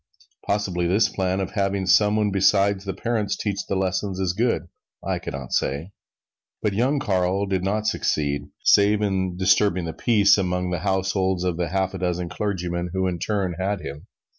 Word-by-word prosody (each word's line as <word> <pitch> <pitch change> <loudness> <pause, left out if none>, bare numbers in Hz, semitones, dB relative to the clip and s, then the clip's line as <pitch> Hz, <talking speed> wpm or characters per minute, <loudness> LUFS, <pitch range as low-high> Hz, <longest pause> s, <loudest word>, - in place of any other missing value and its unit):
Possibly 95 -4 0
this 105 +5 +3
plan 95 -1 -1
of 95 -2 -3
having 100 -1 -1
some 105 +3 +4
one 105 -1 +1
besides 100 0 +2
the 95 - -3
parents 110 -4 -1
teach 100 -2 -2
the 100 - -1
lessons 95 0 -1
is 95 -2 0
good 115 -3 0 0.4
I - - -1
can - - -6
not 65 -3 -6
say. 75 +8 -1 0.7
But 105 - -1
young 125 +8 +1
Carl 95 -4 0
did 95 -2 -1
not 105 +3 -1
succeed 70 -8 -1
save 105 +1 +4
in 95 -3 -1
disturbing 95 -1 +3
the 80 - -4
peace 100 -4 +4
among 90 -1 -1
the 90 - -1
households 95 -1 0
of 90 -2 -1
the 90 -1 -1
half 95 +1 0
dozen 90 -2 -2
clergymen 90 -4 -3
who 95 0 0
in 90 -2 -2
turn 95 -2 -1
had 100 +2 -1
him. 70 +2 -8
95 Hz, 180 wpm, -23 LUFS, 90-100 Hz, 0.7 s, some